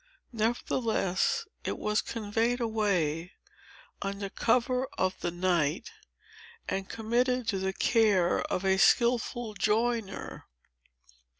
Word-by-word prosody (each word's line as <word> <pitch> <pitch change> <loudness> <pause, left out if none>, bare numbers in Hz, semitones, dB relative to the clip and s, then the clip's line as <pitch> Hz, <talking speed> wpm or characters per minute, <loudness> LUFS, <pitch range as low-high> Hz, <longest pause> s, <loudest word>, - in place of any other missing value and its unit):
Nevertheless, 225 - 0 0.2
it - - -3
was 210 0 0
conveyed 230 +2 -1
away, 190 -8 0 0.7
under 200 0 -3
cover 250 +2 +1
of 185 0 +1
the 175 - -2
night, 175 -2 0 0.8
and 195 0 -3
committed 245 +2 0
to 195 - 0
the 190 0 -1
care 205 -6 +3
of 190 - -1
a 190 0 +3
skilful 235 +1 +2
joiner. 220 -1 -1
215 Hz, 100 wpm, -29 LUFS, 190-235 Hz, 0.8 s, care